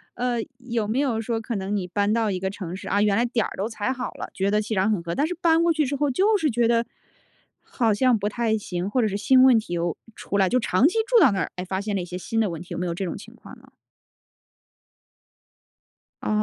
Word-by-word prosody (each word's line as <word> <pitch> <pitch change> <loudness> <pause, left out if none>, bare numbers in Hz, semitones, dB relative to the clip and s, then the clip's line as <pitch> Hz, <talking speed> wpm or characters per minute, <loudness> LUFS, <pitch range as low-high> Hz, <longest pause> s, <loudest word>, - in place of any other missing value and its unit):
呃， 245 -1 -1 0.2
有 235 -4 -3
没 235 +5 0
有 255 -6 0
说 225 0 -2
可 230 +1 -4
能， 195 +1 -2
你 185 -3 -2
搬 205 +3 0
到 225 -1 +1
一 185 - -2
个 190 +1 -2
城 185 -3 -6
市， 190 - -9
啊， 200 +2 +1
原 205 -1 +3
来 235 - +2
点 235 -2 0
儿 - - -6
都 195 - -1
踩 220 +1 -3
好 255 -1 -4
了， - - -8
觉 195 +1 0
得 210 +1 +2
气 215 +1 -3
场 195 +3 +2
很 205 -5 0
合。 170 0 -4
但 285 - +1
是 345 - -2
搬 330 -1 +3
过 340 - +3
去 305 -2 +1
之 280 - -2
后 285 0 0
就 415 - +3
是 310 -5 +1
觉 235 0 +2
得， 230 0 +2 0.8
好 230 -4 0
像 250 +2 +3
不 205 +1 -1
太 225 0 0
行， 180 -2 -4
或 250 +4 +1
者 220 - +2
是 200 -1 -2
新 255 +5 +5
问 260 -3 +7
题 175 -5 -7
又 170 -1 -1 0.2
出 200 - -3
来 190 -2 +3
就 255 - +2
长 225 +4 +3
期 385 - -1
住 - - +5
到 295 - +6
那 195 - -1
儿， - - -2
哎， 180 0 -5
发 190 +1 -3
现 205 0 -3
了 190 - -1
一 - - -5
些 180 +1 -6
新 225 +5 -3
的 215 -4 +2
问 165 -1 -6
题， 180 - -12
有 - - -4
没 180 - -2
有 170 - -2
这 180 - -4
种 175 - -4
情 - - -12
况 - - -13
呢？ - - -20 2.6
哦 - - -2
220 Hz, 290 characters per minute, -24 LUFS, 190-250 Hz, 2.6 s, 问